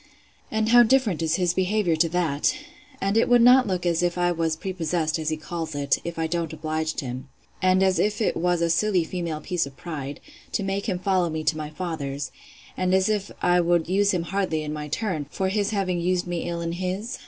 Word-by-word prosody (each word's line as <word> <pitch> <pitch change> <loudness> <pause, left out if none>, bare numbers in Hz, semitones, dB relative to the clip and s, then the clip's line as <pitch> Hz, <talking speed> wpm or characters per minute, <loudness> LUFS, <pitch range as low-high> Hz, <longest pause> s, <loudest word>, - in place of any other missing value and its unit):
And 220 0 0
how 240 +1 +8
different 235 - +3
is 160 -1 +1
his 180 -2 +1
behaviour 190 -2 +1
to 165 +1 +3
that! 160 -4 +1 0.4
And 195 +1 0
would 230 +2 +3
it - - +6
not 250 0 +7
look 180 -2 -2
as 170 -1 +2
if 175 0 0
I 175 0 +2
was 165 -2 0
prepossessed, 165 -3 -2
as 155 -1 -1
he 155 - -1
calls 160 0 -5
it, 140 -1 +1
if 170 0 -5
I 165 - 0
don't 165 -1 -2
oblige 155 0 -3
him; 130 +1 -6 0.3
and 185 0 +4
as 190 -1 +2
if 210 0 +1
it 220 - +1
was 175 0 +1
a 170 - +2
silly 190 0 +2
female 165 -2 -4
piece 175 -2 -1
of 135 - -13
pride, 145 -5 -6 0.3
to 205 - 0
make 195 +2 -2
him 185 - 0
follow 185 -2 +1
me 160 0 -3
to 155 - +2
my 155 -1 -5
father's; 150 -4 -4 0.4
and 185 0 +1
as 190 +2 +2
if 205 -2 -1
I 175 0 +4
would 170 -1 +2
use 200 +3 +2
him 175 -3 0
hardly 180 -4 -1
in 150 0 -4
my 150 -1 -5
turn, 155 -3 -2
for 190 +4 -1
his 205 0 0
having 190 -4 -1
used 180 +1 0
me 175 -1 -3
ill 170 0 -3
in 165 0 -2
his? 185 +7 -3
175 Hz, 225 wpm, -25 LUFS, 160-190 Hz, 0.4 s, how